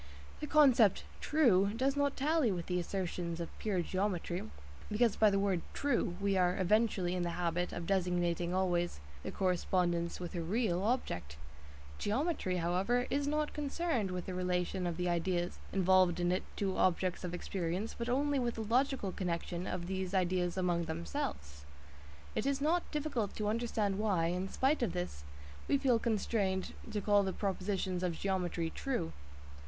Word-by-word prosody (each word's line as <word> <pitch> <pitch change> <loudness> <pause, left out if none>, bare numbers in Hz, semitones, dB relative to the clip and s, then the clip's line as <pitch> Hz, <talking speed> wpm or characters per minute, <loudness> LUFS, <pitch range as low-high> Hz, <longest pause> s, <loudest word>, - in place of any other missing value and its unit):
The 300 - -4
concept 260 -10 +5 0.2
"true" 210 -10 +3
does 270 +3 +1
not 285 -1 +1
tally 295 -3 +2
with 175 -3 -3
the 180 -1 0
assertions 175 -2 -3
of 170 - -6
pure 195 -5 0
geometry, 185 -2 -1 0.5
because 225 +1 +3
by 215 - +5
the 200 - +1
word 195 -3 +1
"true" 240 -10 0
we 200 -1 +1
are 180 -1 +2
eventually 190 -2 +2
in 180 - -1
the 175 - -1
habit 175 0 0
of 175 - -5
designating 175 -2 0
always 175 - 0 0.2
the - - -5
correspondence 175 -2 0
with 175 -2 -5
a 175 - -2
"real" 185 0 0
object; 90 - -1 0.6
geometry, 230 - 0
however, 185 +9 +1
is 285 +1 +1
not 300 0 0
concerned 290 - -1
with 180 -1 -4
the 185 - -4
relation 180 0 -1
of 170 -1 -3
the 180 0 -1
ideas 175 0 0
involved 185 -2 +4
in 175 0 +2
it 185 - +1
to 195 -2 -1
objects 185 0 +1
of 180 -1 -3
experience, 180 +3 -3
but 235 +1 -4
only 280 +2 +2
with 240 -2 -1
the 225 - -3
logical 245 -2 +1
connection 175 -1 -3
of 175 -1 -3
these 190 +1 -3
ideas 180 -1 +1
among 175 -2 +1
themselves. 160 - -4 0.7
It 250 - -1
is 280 0 +1
not 330 +5 +1
difficult 285 -9 -2
to 210 - -2
understand 215 -3 0
why, 190 -6 +2
in 180 +2 -2
spite 270 +7 +1
of 220 -8 0
this, 175 - -4 0.4
we 280 - +3
feel 260 -4 +3
constrained 205 -4 0 0.2
to 210 -2 -2
call 205 0 +4
the 190 -1 -1
propositions 190 -2 -1
of 175 -3 -1
geometry 180 -4 -1
"true." 260 - -2
190 Hz, 165 wpm, -33 LUFS, 175-230 Hz, 0.7 s, concept